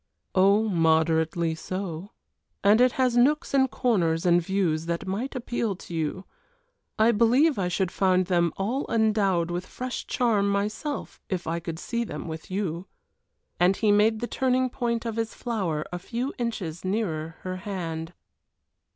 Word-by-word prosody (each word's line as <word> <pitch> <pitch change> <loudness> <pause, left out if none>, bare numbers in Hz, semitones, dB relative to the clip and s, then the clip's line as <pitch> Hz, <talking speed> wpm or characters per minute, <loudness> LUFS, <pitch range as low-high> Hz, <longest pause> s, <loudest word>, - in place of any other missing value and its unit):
"Oh, 200 +3 +4
moderately 160 -1 +2
so, 185 +1 -5 0.5
and 210 +4 +5
it 250 -1 +5
has 255 -2 +1
nooks 295 +7 +3
and 265 -1 +4
corners 170 -12 +1
and 175 0 +5
views 165 -3 0
that 170 +2 -2
might 215 +9 -3
appeal 235 -4 -2
to 175 - -11
you. 165 +4 -2 0.7
I 220 +2 +5
believe 240 +6 +3
I 180 - +1
should 180 0 -1
find 185 -1 +2
them 175 -2 +2
all 235 +9 -2
endowed 205 -6 +2
with 175 +1 -3
fresh 255 0 -5
charm 215 -5 +2
myself, 210 +9 -3
if 185 -3 -2
I 165 +1 -1
could 165 -1 -5
see 235 +7 -2
them 220 - -6
with 160 -1 -7
you" 185 -2 -3 0.7
and 180 +2 +4
he 215 -2 +3
made 215 +2 +3
the 240 - -2
turning 255 0 +1
point 235 -2 -2
of 225 -1 -3
his 225 0 -2
flower 185 -11 -2
a 175 - -3
few 245 +8 -3
inches 190 -9 -3
nearer 170 -6 -2
her 185 0 -4
hand. 170 -4 -5
195 Hz, 160 wpm, -26 LUFS, 170-230 Hz, 0.7 s, and